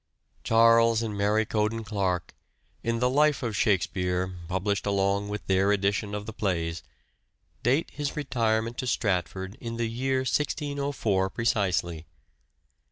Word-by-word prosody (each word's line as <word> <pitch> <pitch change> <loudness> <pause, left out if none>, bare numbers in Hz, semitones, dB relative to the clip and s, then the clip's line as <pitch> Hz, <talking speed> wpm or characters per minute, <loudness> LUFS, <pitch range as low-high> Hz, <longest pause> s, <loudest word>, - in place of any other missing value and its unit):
Charles 115 0 +5
and 110 -2 -3
Mary 105 +2 +2
Cowden 110 +1 -1
Clarke, 95 -4 -2 0.5
in 115 0 -1
the 125 +2 +2
Life 145 +2 +3
of 115 -3 -2
Shakspere 90 -2 0
published 95 +3 -1
along 100 0 +1
with 105 0 -5
their 95 +1 +3
edition 100 +1 0
of 105 0 -5
the 110 - -7
plays, 85 -5 -2 0.8
date 135 +8 +1
his 145 -1 -4
retirement 115 -4 0
to 130 - -2
Stratford 95 -3 -1
in 115 -1 -5
the 120 - 0
year 130 +3 0
1604 140 -8 -1
precisely. 90 -7 0
105 Hz, 130 wpm, -27 LUFS, 95-115 Hz, 0.8 s, Charles